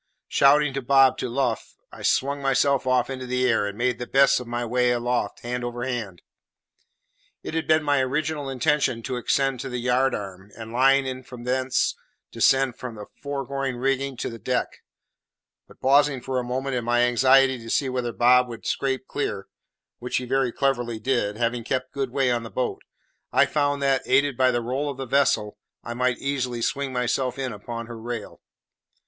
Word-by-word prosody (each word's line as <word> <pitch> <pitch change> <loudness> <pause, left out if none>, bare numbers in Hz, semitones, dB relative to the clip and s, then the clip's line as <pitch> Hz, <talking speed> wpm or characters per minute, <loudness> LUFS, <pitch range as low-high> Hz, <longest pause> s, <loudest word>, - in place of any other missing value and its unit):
Shouting 145 0 +4
to 135 - -2
Bob 135 0 +4
to 125 - -2
luff, 135 +3 -2 0.2
I - - -12
swung 140 +1 +1
myself 135 0 +2
off 125 -1 +2
into 130 -1 -6
the 125 0 +1
air, 110 -4 +2
and 100 0 -6
made 125 0 0
the 125 - -5
best 140 0 +4
of 125 - -8
my 120 0 -3
way 125 +1 +1
aloft 120 0 -1
hand 125 +1 -4
over 120 0 -4
hand. 115 -9 -4 1.2
It - - -6
had 165 -1 -2
been 155 0 +4
my 145 -1 +2
original 145 +2 -2
intention 130 -2 0
to 125 - -3
ascend 135 +1 0
to 135 - -5
the 125 - -4
yard 125 +2 +1
arm, 95 -1 -8
and, 115 0 -8
laying 135 +2 +4
in 130 0 -4
from 125 -1 -11
thence, 130 +1 0 0.4
descend 130 +2 +3
the 110 -5 -7 0.2
fore 140 -1 -3
rigging 135 0 -2
to - - -3
the 115 - -9
deck; 125 +4 -2 0.9
but, - - -19
pausing 140 0 +3
for 130 +1 -2
a - - -3
moment, 130 +2 -3
in 120 - -1
my 120 +1 +2
anxiety 130 +2 +4
to 115 0 -10
see 135 - +1
whether 125 -2 -2
Bob 125 +2 +4
would 115 -2 -9
scrape 130 -1 -1
clear 100 -8 -3 0.5
which 125 +1 -2
he 125 - -3
very 130 0 +1
cleverly 120 -4 -1
did, 110 -3 -1
having 120 0 -1
kept 130 +2 -3
good 135 -2 -2
way 130 0 +1
on 120 -1 0
the 115 - -8
boat 125 +1 -3 0.5
I - - +5
found 145 -1 0
that, 135 -1 +2
aided 140 +1 +3
by 130 +1 +3
the 120 -1 0
roll 135 +5 -2
of 140 - -6
the 135 - -4
vessel, 125 -5 +1 0.2
I 120 - -5
might 125 0 0
easily 125 -4 -2
swing 140 +2 -1
myself 125 +1 -1
in 130 -3 -3
upon 115 +3 -6
her 115 -1 -9
rail. 115 -2 -6
125 Hz, 190 wpm, -24 LUFS, 120-135 Hz, 1.2 s, I